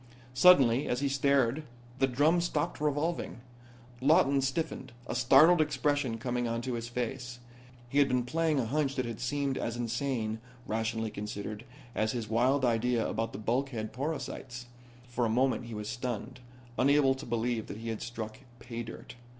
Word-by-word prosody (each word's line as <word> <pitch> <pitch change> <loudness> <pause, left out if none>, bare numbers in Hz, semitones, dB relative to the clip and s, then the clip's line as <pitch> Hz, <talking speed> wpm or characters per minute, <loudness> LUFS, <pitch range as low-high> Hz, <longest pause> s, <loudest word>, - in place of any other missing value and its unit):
Suddenly 135 -4 +6
as 125 +2 -1
he 140 - +2
stared 140 0 +2 0.4
the 135 - +4
drum 150 +7 +3
stopped 170 -1 -2
revolving. 150 +1 -1 0.6
Lawton 140 -1 +4
stiffened, 135 -2 -2
a - - -4
startled 155 +7 +6
expression 145 -4 0
coming 120 0 -2
into 115 +2 -2
his 115 0 -3
face. 125 0 -4 0.5
He 140 +4 +1
had 140 - +5
been 125 -2 +1
playing 160 +3 +1
a 125 - 0
hunch 140 +3 0
that 130 - -1
had 115 -2 -5
seemed 140 +2 -1
as 115 0 -3
insane, 120 -2 -2 0.3
rationally 110 -1 -2
considered, 105 +2 -6 0.3
as 110 +2 0
his 115 -3 -3
wild 130 +5 +2
idea 120 0 +1
about 115 0 -2
the - - -7
bulkhead 115 0 -2
porosities. 130 -3 -4 0.4
For 120 0 -2
a 115 - +2
moment 125 +2 +1
he 115 -2 -7
was 105 0 -5
stunned, 120 +1 -4 0.4
unable 140 0 +5
to 130 - -8
believe 115 -1 -1
that - - -7
he 115 +1 -6
had 110 - -4
struck 110 -2 -6 0.2
pay 120 0 -6
dirt. 115 -1 -9
125 Hz, 165 wpm, -30 LUFS, 115-140 Hz, 0.6 s, Suddenly